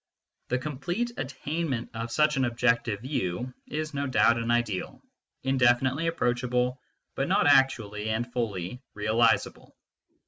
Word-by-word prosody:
The 125 - 0
complete 175 - -3
attainment 140 -1 -3
of 115 +1 -4
such 150 +2 +3
an 135 -1 +2
objective 115 -3 +1
view 125 -2 -3
is 155 0 -4
no 140 0 -1
doubt 115 -2 +4
an 115 0 -3
ideal, 120 -5 -1 0.4
indefinitely 130 +3 +2
approachable, 125 -4 0 0.3
but - - -1
not - - +3
actually 110 -7 +3
and 120 +2 -2
fully 110 -1 -3
realisable. 110 +3 +1
125 Hz, 125 wpm, -27 LUFS, 115-140 Hz, 0.4 s, doubt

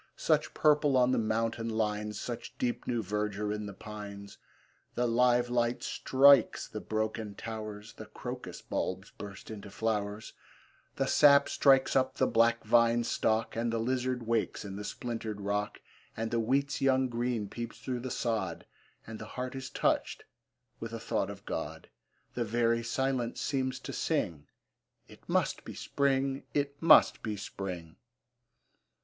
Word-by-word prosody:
Such - - +1
purple 150 -3 +4
on 125 0 +4
the - - +2
mountain 115 +1 -1
lines, 105 -1 -1
Such 120 -2 -6
deep 120 -1 -2
new 120 -2 0
verdure 105 +1 -2
in 105 0 -4
the 100 - -7
pines! 100 -1 -9 0.6
The 125 - +1
live 120 +1 +3
light 120 0 0
strikes 135 -2 +4
the - - -6
broken 110 -1 -2
towers, 110 -1 -7
The - - -10
crocus - - -7
bulbs - - -3
burst 100 +1 -9
into 105 -1 -8
flowers, 105 0 -2 0.6
The 135 - 0
sap 140 0 +6
strikes 135 -2 +4
up 130 -1 +2
the - - +2
black 115 0 +3
vine 115 +1 +4
stock, 110 -1 0
And 115 +1 0
the 115 - 0
lizard 125 +1 -1
wakes 115 -2 -1
in 95 -1 -6
the 105 - -5
splintered 115 -2 -4
rock, 105 +1 -2 0.4
And 115 0 -2
the 115 - +1
wheat's 140 +5 0
young 130 -1 +3
green 120 -3 -1
peeps 115 +2 -6
through 125 -2 -4
the 130 +2 -5
sod, 115 -2 -2 0.4
And 110 -1 -8
the 110 - -7
heart 125 0 -3
is 130 0 -6
touched - - 0 0.6
with 115 0 -6
a 115 - -4
thought 110 -3 -1
of 100 -1 -9
God; - - -5 0.4
The 120 - -1
very 115 +1 +1
silence 125 0 -1
seems 130 -2 -1
to - - -6
sing, 75 -4 -1 0.6
It - - -17
must - - +1
be - - -8
Spring, 135 -1 0
it 140 0 -1
must 165 - +7
be 105 -2 -3
Spring! 90 -5 -6
115 Hz, 155 wpm, -31 LUFS, 105-125 Hz, 0.6 s, must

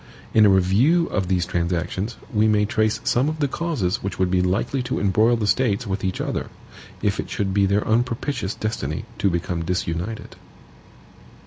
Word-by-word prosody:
In 110 -1 +6
a - - +5
review 105 - +4
of 95 -3 -1
these 90 -2 +1
transactions 90 +4 -2 0.2
we 110 0 +3
may 105 -1 +3
trace 110 +1 +1
some 130 +5 +2
of 155 - -4
the 145 - +2
causes 130 - -2
which 95 -1 -4
would 95 -1 +1
be 90 -1 +3
likely 110 +9 0
to 125 +1 -2
embroil 105 +5 +3
the 110 - -1
States 115 0 +1
with 95 -1 -3
each 95 -1 -2
other, - - -2 0.6
if 105 0 +1
it - - -4
should 95 -2 -2
be 100 0 +3
their 100 +2 +1
unpropitious 120 -1 -1
destiny 80 -9 -3
to 100 - +3
become 85 -1 -2
disunited. 90 +4 -3
100 Hz, 180 wpm, -23 LUFS, 95-115 Hz, 0.6 s, In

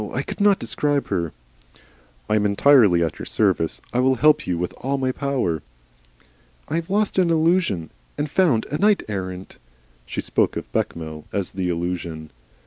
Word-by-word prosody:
I 130 - -1
could - - -6
not 200 -1 +5
describe 140 +5 -1
her 85 -3 -1 0.5
" - - -31
"I - - +1
am 105 - +2
entirely 105 -4 +5
at 80 - -3
your - - -6
service. - - +1
I 125 - +1
will 130 +1 +3
help 150 +4 +3
you 90 -1 0
with 90 +1 -3
all 140 +2 -2
my 130 -1 0
power." 130 - -1 1.1
"I 160 - -1
have 165 -1 -4
lost 205 0 +1
an 180 -2 +3
Illusion 160 - +1 0.3
and 150 - -1
found 145 -8 +2
a 150 - -2
Knight 210 0 +3
errant." 95 -2 -6 0.5
She - - -5
spoke - - 0
of - - -7
Bechamel 80 -2 -3
as 100 -3 -1
the 90 -1 -2
Illusion. 85 -2 -4
110 Hz, 175 wpm, -22 LUFS, -, 1.1 s, not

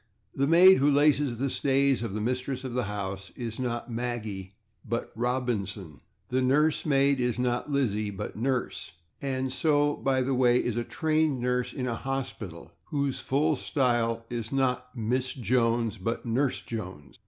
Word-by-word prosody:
The 140 +1 +1
maid 180 +4 +8
who 140 +2 +4
laces 145 -3 +3
the 135 +4 0
stays 135 -1 +2
of 115 -4 -3
the 110 - -2
mistress 130 +3 -2
of 130 -2 -5
the 125 -1 0
house 95 -1 -5
is 115 -2 -5
not 120 -1 -3
/Maggie/ 110 -5 -4 0.3
but 115 +2 -4
/Robinson/. 110 - -2 0.3
The 130 +1 +1
nurse 150 +5 +2
maid 140 -1 +3
is 125 -2 0
not 125 +2 -1
/Lizzie/ 110 -7 0
but 100 - -6
/Nurse/. 125 +2 -1 0.7
So, 145 0 +2
by 130 -1 +1
the 135 +1 0
way, 125 -1 +4
is 120 -2 0
a 120 - 0
trained 155 -1 +1
nurse 125 0 0
in 130 - -4
a 120 - -1
hospital, 115 -11 -5
whose 140 -2 -1
full 150 +3 +1
style 120 -5 0
is 115 -2 -4
not 125 -1 -1
/Miss 125 +4 -1
Jones/, 115 -1 +1
but 115 +7 -3
/Nurse 125 +4 0
Jones 95 -11 -7
125 Hz, 160 wpm, -28 LUFS, 115-135 Hz, 0.7 s, maid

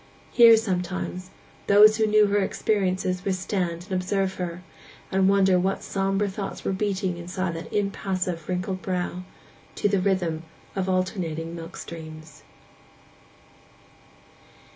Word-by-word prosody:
Here, 230 -2 +8
sometimes, 185 -2 -3 0.4
those 210 +2 +7
who 220 -1 +2
knew 215 0 +5
her 205 0 +2
experiences 185 -2 0
would 195 -2 0
stand 180 -2 -2
and 190 - -15
observe 190 +1 0
her, 180 0 -5 0.5
and 190 0 +3
wonder 190 -2 +4
what 190 +2 -1
sombre 195 +1 0
thoughts 195 0 -6
were - - 0
beating 190 -2 -1
inside 180 +1 -3
that 165 - -7
impassive, 185 -4 -2
wrinkled 185 +1 -2
brow, 180 -1 -2 0.5
to - - +1
the 200 -1 +2
rhythm 180 -5 0 0.3
of 190 -1 -1
the - - +1
alternating 170 -3 -2
milk 165 +1 -8
streams. 155 -1 -9
185 Hz, 130 wpm, -25 LUFS, 180-200 Hz, 0.5 s, Here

